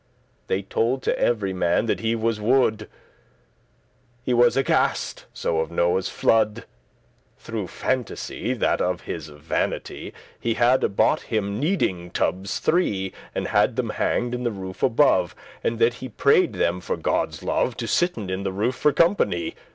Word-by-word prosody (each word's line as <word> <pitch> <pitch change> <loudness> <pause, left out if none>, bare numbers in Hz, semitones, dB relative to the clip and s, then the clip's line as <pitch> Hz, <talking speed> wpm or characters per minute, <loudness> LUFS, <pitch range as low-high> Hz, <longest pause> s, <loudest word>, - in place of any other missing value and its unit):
They 95 +1 -1
told 120 +6 0
to - - 0
every 105 -5 +1
man 90 +3 +1
that 115 - 0
he 115 0 0
was 115 -1 -1
wood*; 120 -1 +3
*mad 105 - -9 1.4
He 125 - 0
was 120 +2 +4
aghaste* 135 - 0
so 80 - -1
of 80 - -1
Noe's 85 +2 +1
flood, 110 -1 +3
*afraid - - -10 0.7
Through - - -5
phantasy, - - -2
that - - +1
of - - -1
his - - -6
vanity 75 +2 -3 0.3
He 115 -1 -1
had 125 +2 +4
y - - +3
bought 100 - +2
him 105 -1 -2
kneading 120 - 0
tubbes 95 +2 -1
three, 100 - 0 0.2
And - - -2
had - - +3
them - - -1
hanged 120 0 0
in 125 - -3
the 120 - +1
roof 95 -3 -7
above; 115 - +3 0.3
And 115 - 0
that 115 +1 +3
he 130 +1 -8
prayed 140 - +3
them 90 -1 0
for 90 - -3
Godde's - - -1
love 125 - 0
To 115 - -3
sitten 115 - 0
in 95 +1 -2
the 95 -1 -2
roof 105 +7 0
for 140 +3 +2
company. 130 - +2
110 Hz, 165 wpm, -24 LUFS, 95-125 Hz, 1.4 s, was